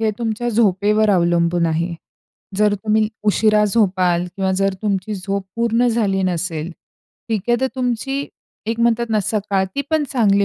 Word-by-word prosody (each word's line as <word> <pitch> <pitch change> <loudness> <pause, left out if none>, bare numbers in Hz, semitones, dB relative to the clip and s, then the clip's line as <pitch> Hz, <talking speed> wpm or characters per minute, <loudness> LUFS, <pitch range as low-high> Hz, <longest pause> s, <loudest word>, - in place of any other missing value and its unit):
हे 220 -1 +2
तुमच्या 235 +1 -2
झोपेवर 210 -1 +2
अवलंबून 170 -1 +2
आहे. 165 +2 -1 0.6
जर 210 0 +3
तुम्ही 215 +1 +1 0.2
उशिरा 210 0 +3
झोपाल 185 -5 +2
किंवा 190 -1 0
जर 195 0 +1
तुमची 205 0 -1
झोप 195 +1 -3
पूर्ण 235 +1 +2
झाली 205 -5 +1
नसेल, 175 -2 -2 0.6
ठीक 220 -3 0
आहे 240 - +4
तर 265 - +2
तुमची 260 +3 -1 0.4
एक 230 +1 -2
म्हणतात 235 0 +2
ना 215 -1 +2
सकाळ 200 -1 0
ती 280 - -1
पण 310 -2 +2
चांगली 200 -5 +3
210 Hz, 155 wpm, -19 LUFS, 190-225 Hz, 0.6 s, आहे